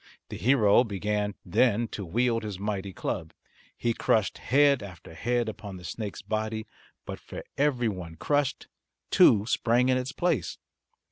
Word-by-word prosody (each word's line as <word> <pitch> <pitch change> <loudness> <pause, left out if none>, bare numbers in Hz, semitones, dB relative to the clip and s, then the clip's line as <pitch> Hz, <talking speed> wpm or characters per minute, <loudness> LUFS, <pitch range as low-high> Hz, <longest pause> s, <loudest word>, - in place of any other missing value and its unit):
The - - -6
hero 120 -3 +4
began 105 -1 -2
then 115 +5 +2
to 100 - -5
wield 115 +6 +1
his 105 -4 -5
mighty 100 -1 -3
club. 80 -2 -4 0.4
He 120 -1 0
crushed 110 -2 +1
head 140 -1 +4
after 90 -5 -10
head 120 +7 0
upon 100 -3 -7
the 90 - -12
snake's 100 +3 -6
body, 110 +1 -2 0.4
but - - -6
for - - -9
every 135 -4 +1
one 90 -6 -5
crushed 145 - 0 0.4
two 105 -1 +6
sprang 120 +2 +2
in 130 - +3
its 130 +1 -4
place. 175 -7 -1
110 Hz, 150 wpm, -27 LUFS, 100-125 Hz, 0.4 s, two